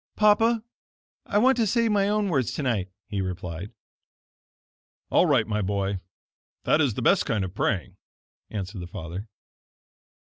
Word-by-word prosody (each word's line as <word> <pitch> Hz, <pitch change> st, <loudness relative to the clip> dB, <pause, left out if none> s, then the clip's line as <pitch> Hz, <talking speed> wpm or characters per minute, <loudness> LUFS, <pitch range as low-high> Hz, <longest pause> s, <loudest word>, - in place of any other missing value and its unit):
"Papa, 220 Hz, +2 st, +4 dB, 0.6 s
I 205 Hz, -, +1 dB
want 260 Hz, +5 st, +5 dB
to 225 Hz, -2 st, +2 dB
say 230 Hz, +3 st, +2 dB
my 205 Hz, -2 st, +2 dB
own 210 Hz, -1 st, +1 dB
words, 135 Hz, -, 0 dB
tonight," 115 Hz, -10 st, -1 dB, 0.2 s
he 100 Hz, -3 st, -3 dB
replied. 90 Hz, 0 st, -5 dB, 1.4 s
"All 180 Hz, -, +5 dB
right, 130 Hz, -8 st, +3 dB
my 105 Hz, -1 st, -1 dB
boy, 100 Hz, 0 st, -1 dB, 0.6 s
that -, -, +3 dB
is -, -, +1 dB
the -, -, -3 dB
best -, -, +4 dB
kind 105 Hz, -4 st, 0 dB
of 90 Hz, -, -7 dB
praying," 100 Hz, -4 st, -1 dB, 0.5 s
answered 100 Hz, -2 st, -5 dB
the 90 Hz, -, -6 dB
father. 90 Hz, +3 st, -7 dB
110 Hz, 145 wpm, -26 LUFS, -, 1.4 s, want